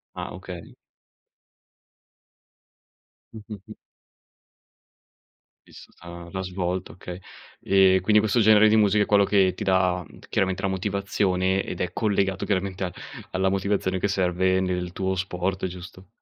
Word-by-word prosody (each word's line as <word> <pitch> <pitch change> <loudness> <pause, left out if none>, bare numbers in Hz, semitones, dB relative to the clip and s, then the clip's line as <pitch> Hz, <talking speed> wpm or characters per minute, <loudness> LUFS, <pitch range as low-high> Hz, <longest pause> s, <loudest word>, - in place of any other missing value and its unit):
Ah, - - -6
okay. 90 -2 -10 2.6
Mh, 110 - -8
mh, 105 - -6
mh. 110 - -9 1.9
Vissuta 85 0 -12
l'ha 95 -1 -4
svolto, 90 0 -3
okay. 90 0 -9 0.5
Ehm, 95 -1 +5
quindi 105 +3 +3
questo 110 +2 +1
genere 110 0 +6
di 110 - +4
musica 105 0 +3
è - - -3
quello 100 -1 +4
che 95 -2 +3
ti 105 +2 -6
dà 90 -2 +1 0.2
chiaramente 95 0 0
la 95 - 0
motivazione 95 -1 0
ed 90 - -6
è 90 -1 -2
collegato 95 -3 0
chiaramente 95 -1 -2
a 90 - -5 0.4
alla 95 0 +1
motivazione 95 -1 -1
che 100 - 0
serve 95 -1 +1
nel 90 -1 -2
tuo 95 0 -2
sport, 95 +1 -2
giusto? 90 +1 -11
95 Hz, 135 wpm, -24 LUFS, 90-100 Hz, 2.6 s, genere